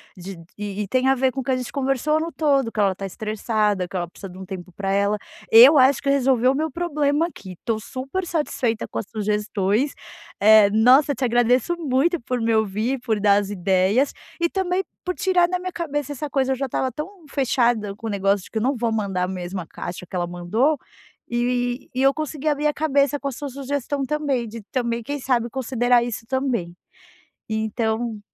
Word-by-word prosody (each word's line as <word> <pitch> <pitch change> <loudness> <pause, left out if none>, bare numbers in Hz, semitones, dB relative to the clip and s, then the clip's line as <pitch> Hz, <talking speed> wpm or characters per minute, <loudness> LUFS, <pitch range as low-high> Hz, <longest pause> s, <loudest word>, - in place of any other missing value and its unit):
De 185 0 -8 0.2
e 205 0 -4
e - - -6
tem 255 +4 +1
a 270 - +4
ver 260 0 +2
com 270 - -5
o - - -7
que 265 - -6
a - - +3
gente 250 - -5
conversou 275 +3 0
no 330 +1 -3
todo, 275 -5 +1
que - - -5
ela 195 -2 +3
tá 195 - -10
estressada, 210 -1 -1
que 190 - -11
ela 175 -1 -2
precisa 195 +2 -10
de 185 - -12
um 190 - -8
tempo 185 -1 -8
pra 195 0 -3
ela. 200 +1 +2 0.3
Eu 260 +6 +9
acho 265 +1 +4
que 275 - 0
resolveu 260 -2 +3
o - - -1
meu 315 +3 -1
problema 300 -2 0
aqui. 195 - -9
Tô 225 -2 0
super 270 - -5
satisfeita 260 -9 -1
com - - -4
as 200 - -6
sugestões, 210 +3 0 0.5
eh, 215 0 +7
nossa, 255 +7 +5
te 260 - -1
agradeço 245 +7 +2
muito 310 +2 +1
por 250 +1 -2
me 225 0 +1
ouvir, 220 +4 0
por 225 -4 -1
dar 205 0 +4
as 200 - -6
ideias 195 +7 +2 0.3
e, 340 - +2
também, 380 0 0 0.2
por 365 0 -2
tirar 360 -2 +2
na 365 - 0
minha 365 0 -5
cabeça 295 -5 -3
essa 290 +2 -5
coisa 265 -1 +1
eu - - +2
já 275 +1 -2
estava 260 +1 -1
tão 300 +9 -5 0.2
fechada 240 -7 +1
com 225 - -11
o 225 - -2
negócio 200 -1 +1
de - - -15
que 220 - -1
eu - - -3
não 265 +2 +1
vou 230 0 0
mandar 200 -4 -1
a - - 0
mesma 180 -1 -5
caixa 175 +2 -7
que 185 - -9
ela 175 -1 -1
mandou, 215 - 0 0.5
e 245 +1 -1
e 260 - 0
eu 270 +1 +5
consegui 310 0 -4
abrir 295 +1 +1
a 295 - +1
cabeça 285 -2 +1
com 280 - -4
a - - -5
sua 285 +3 -6
sugestão 275 +1 -3
também, 280 -4 -1
de 225 +1 -8
também, 235 -2 -1
quem 285 +5 -4
sabe, 240 -3 0
considerar 245 -2 +2
isso, 235 -1 -5
também, 250 -10 -1 0.7
então 220 +1 -1
245 Hz, 215 wpm, -23 LUFS, 210-280 Hz, 0.7 s, Eu